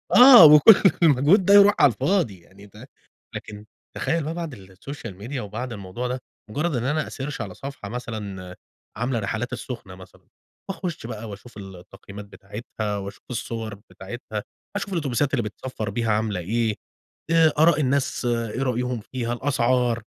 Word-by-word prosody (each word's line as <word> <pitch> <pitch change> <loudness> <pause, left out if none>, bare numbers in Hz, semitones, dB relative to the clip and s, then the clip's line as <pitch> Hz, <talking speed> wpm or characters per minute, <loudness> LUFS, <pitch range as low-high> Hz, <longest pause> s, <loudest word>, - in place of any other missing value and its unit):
آه، 245 -8 +10
وكل 150 +8 +8 0.2
المجهود 155 +6 +4
ده 200 - +5
يرُوح 205 0 +8
على - - +6
الفاضي 170 - 0
يعني 95 +4 -17
ده 105 +6 -14 0.5
لكن 105 0 -8 0.3
تخيّل 165 -1 -1
بقى 155 +3 -3
بعد 165 -5 -5
الSocial 95 +1 -10
Media 130 +6 -5
وبعد 120 +2 -5
الموضوع 100 +4 -5
ده، 125 +1 -4 0.3
مجرّد 150 +7 -1
إن 120 - -2
أنا 150 +4 -1
أsearch 135 -1 -5
على 100 -3 -6
صفحة 135 -5 -8
مثلًا، 105 -6 -6 0.4
عاملة 125 +1 -1
رحلات 110 +4 -3
السخنة 115 -7 -7
مثلًا، 95 0 -16 0.4
وأخُش 180 -8 -5
بقى 110 -1 -7
وأشوف 105 +4 -11
ال 95 -2 -9
التقييمات 100 +3 -12
بتاعتها 105 +1 -6
وأشوف 100 0 -8
الصُّوَر 115 -3 -5
بتاعتها، 105 +1 -7 0.3
أشوف 205 0 -3
الأوتوبيسات 145 - -1
اللي 120 -4 +1
بتسفّر 110 +1 -6
بيها 115 +2 -1
عاملة 105 -2 0
إيه، 110 +4 -1 0.6
آآ 165 -2 +5
أراء 160 0 +5
الناس 135 -1 0
إيه 120 +1 -1
رأيهم 125 -2 -1
فيها، 120 -2 -2
الأسعار، 125 -2 0
120 Hz, 155 wpm, -23 LUFS, 105-140 Hz, 0.6 s, آه